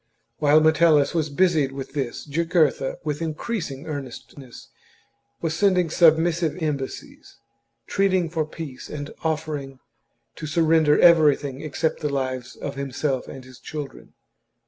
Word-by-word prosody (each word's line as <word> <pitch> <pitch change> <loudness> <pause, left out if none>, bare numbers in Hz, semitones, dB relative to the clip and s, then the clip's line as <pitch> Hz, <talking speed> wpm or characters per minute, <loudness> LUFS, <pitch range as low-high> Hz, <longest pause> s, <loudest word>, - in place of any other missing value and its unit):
While 150 +1 +5
Metellus 155 -2 +4
was 160 -3 0
busied 150 -3 +2
with 135 0 -7
this, 135 -5 -4
Jugurtha, 155 -2 +1
with 150 0 -3
increasing 160 - -4
earnestness, 135 -3 -9 0.7
was 160 -1 -1
sending 180 -2 +2
submissive 165 0 +3
embassies, 145 -5 -5 0.5
entreating 190 -3 +1
for 160 -2 0
peace 155 -5 -8
and 145 -1 -6
offering 150 -4 -3 0.6
to 155 - -6
surrender 160 -1 +3
everything 150 -5 +4
except 155 +1 -2
the 150 - -2
lives 130 -3 -3
of 140 - -6
himself 135 -1 -3
and 130 -1 -10
his 130 -1 -14
children. 145 -4 -8
150 Hz, 125 wpm, -23 LUFS, 140-165 Hz, 0.7 s, While